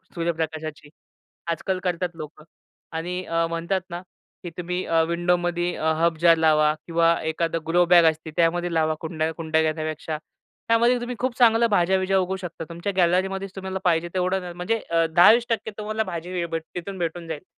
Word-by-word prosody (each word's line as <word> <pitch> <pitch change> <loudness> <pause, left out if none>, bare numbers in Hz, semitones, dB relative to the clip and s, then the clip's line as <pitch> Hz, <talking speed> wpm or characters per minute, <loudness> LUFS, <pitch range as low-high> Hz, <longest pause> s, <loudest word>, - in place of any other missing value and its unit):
सूर्यप्रकाशाची. 160 -3 -3 0.6
आज-काल 185 +3 -2
करतात 180 -1 -1
लोकं. 155 -1 -9 0.5
आणि 180 +3 -3
अ, 165 0 0
म्हणतात 170 +3 -1
ना 175 0 -5 0.4
की 175 - -5
तुम्ही 180 +1 -3
अ, 165 -1 +2
विंडोमध्ये 175 0 0
अ, 160 +1 0
हर्ब 170 -1 +2
जार 170 -1 +7
लावा 155 -1 +4
किंवा 170 0 +3
एखादं 165 +1 -1
ग्रो 175 +2 +4
बॅग 175 -1 +6
असती, 160 0 -10
त्यामध्ये 175 +1 +1
लावा, 160 -1 +2
कुंड्या 160 -1 -2
कुंड्या 160 -1 0
घेण्यापेक्षा. 155 0 -2 0.5
त्यामध्ये 235 +2 +3
तुम्ही 245 +1 -4
खूप 255 -1 -1
चांगलं 235 -1 +5
भाज्या-बिज्या 190 0 +2
उगवू 185 +1 -1
शकता. 175 -3 -7
तुमच्या 170 +4 -4
गॅलरीमध्येच 190 +2 +1
तुम्हाला 190 0 -4
पाहिजे 170 -1 +2
तेवढं 185 +1 0
न - - -12
म्हणजे 180 +6 -1
अ, 165 0 +3
10-20% 225 +4 +5
तुम्हाला 215 +1 -2
भाजी 175 -3 -6
वी 175 -2 -1 0.3
तिथून 190 +2 -5
भेटून 170 -1 -4
जाईल. 160 -3 -6
175 Hz, 165 wpm, -24 LUFS, 165-185 Hz, 0.6 s, जार